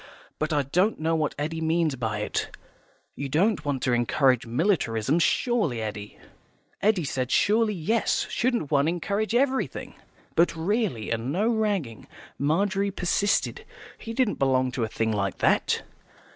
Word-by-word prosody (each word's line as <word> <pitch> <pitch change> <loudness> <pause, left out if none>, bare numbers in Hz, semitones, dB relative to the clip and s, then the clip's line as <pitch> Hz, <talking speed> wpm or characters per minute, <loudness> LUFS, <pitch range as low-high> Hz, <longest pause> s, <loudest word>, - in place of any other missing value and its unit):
But 155 +1 -1
I 145 -2 +2
don't 180 - +1
know 165 +1 +1
what 155 -2 -1
Eddy 160 +3 -3
means 160 -2 +1
by 110 -4 -2
it. - - -3 0.6
You 140 -1 -4
don't 180 +5 +2
want 140 -3 -2
to 125 - +2
encourage 120 +1 +2
militarism, 130 - +1
surely, 170 - +1
Eddy." 105 -1 -6 0.6
Eddy 205 -4 +2
said 130 -3 -2
surely 215 +4 +2
yes, 220 +7 0
shouldn't 235 - -1
one 145 0 +3
encourage 200 +6 -1
everything? 265 +1 0 0.4
But 170 0 +3
really, 170 - -1
and 115 +3 -2
no 205 +8 +1
ragging, 205 - -1 0.3
Margery 195 +7 +1
persisted, 200 +2 0 0.4
he 225 - -7
didn't 230 -2 0
belong 130 -2 +2
to 125 -2 -2
a - - 0
thing 110 +1 -1
like 100 -3 -1
that? - - +2
160 Hz, 145 wpm, -26 LUFS, 130-205 Hz, 0.6 s, one